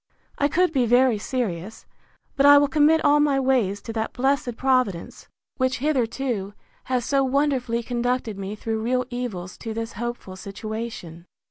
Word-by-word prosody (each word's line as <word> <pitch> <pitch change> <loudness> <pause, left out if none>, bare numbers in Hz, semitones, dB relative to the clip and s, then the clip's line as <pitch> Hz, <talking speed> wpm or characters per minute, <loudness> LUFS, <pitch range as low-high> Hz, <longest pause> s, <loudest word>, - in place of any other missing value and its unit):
I 285 - +3
could 350 +3 +1
be 255 -4 +2
very 245 -1 +4
serious: 215 -5 -4 0.5
But 275 +1 +4
I 285 0 +9
will 285 0 +4
commit 310 +2 +3
all 295 +1 +5
my 290 -2 +3
ways 245 -7 +1
to 225 - -6
that 220 0 -3
blessed 260 -2 0
Providence, 255 -10 0 0.3
which 260 +1 +1
hitherto 245 -7 -1 0.3
has 250 -2 -1
so 275 -1 +2
wonderfully 260 -3 0
conducted 245 -2 -1
me 195 +2 -5
through 220 +1 -3
real 250 +2 0
evils 210 -8 -5
to 225 -2 -6
this 225 0 -4
hopeful 240 -4 -5
situation. 195 -4 -7
245 Hz, 155 wpm, -24 LUFS, 220-270 Hz, 0.5 s, I